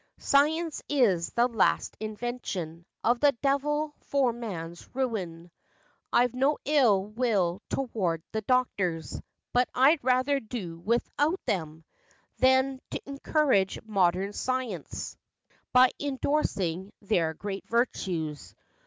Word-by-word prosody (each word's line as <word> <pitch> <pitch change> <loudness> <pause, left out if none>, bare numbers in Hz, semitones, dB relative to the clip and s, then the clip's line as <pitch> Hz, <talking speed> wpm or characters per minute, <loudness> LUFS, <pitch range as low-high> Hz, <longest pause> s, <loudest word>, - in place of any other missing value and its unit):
Science 310 +3 +2
is 205 -12 +2
the 240 +1 +3
last 230 -5 +1
invention 210 -7 -5 0.2
Of 240 +1 +3
the 285 +1 +5
devil 295 +2 +1
for 270 -4 +1
man's 175 -8 -7
ruin. 180 -10 -3 0.6
I've 245 0 +3
no 270 +4 +2
ill 245 -10 +4
will 210 -5 0
toward 190 -11 -1
the 220 - -2
doctors; 195 -9 0 0.3
But 250 +1 +3
I'd 280 +4 +5
rather 260 +3 +2
do 210 -9 -6
without 285 - 0
them, 160 -4 -2 0.6
Than 260 +1 +3
t' - - -3
encourage 275 -7 +1
modern 195 -2 +1
science 250 - -3 0.6
By 250 0 +6
indorsing 205 - -1
their 170 -6 +1
great 195 +2 -6
virtues." 175 - -2
235 Hz, 110 wpm, -28 LUFS, 185-265 Hz, 0.6 s, By